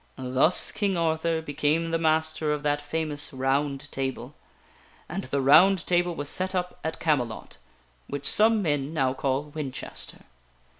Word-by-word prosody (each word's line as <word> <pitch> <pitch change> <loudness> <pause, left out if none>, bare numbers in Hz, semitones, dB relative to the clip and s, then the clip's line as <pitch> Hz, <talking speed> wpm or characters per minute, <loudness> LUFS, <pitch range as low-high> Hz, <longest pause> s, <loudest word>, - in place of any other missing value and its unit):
Thus 130 +6 +3
King 200 -3 -1
Arthur 160 0 0
became 155 +2 0
the 165 - 0
master 155 -1 +1
of 150 0 -4
that 145 0 0
famous 150 -1 -1
ROUND 135 +1 -1
TABLE. 130 0 -4 0.7
And - - -5
the 140 +1 -1
ROUND 180 +7 +6
TABLE 175 -1 +1
was 145 -2 -4
set 185 +5 -1
up, 180 0 -3
at 160 - -4
Camelot 125 -8 -2 0.5
(which 140 0 -5
some 220 0 +4
men 145 -1 -1
now 130 -4 +1
call 135 +1 -1
Winchester). 140 -4 -6
150 Hz, 145 wpm, -26 LUFS, 140-165 Hz, 0.7 s, ROUND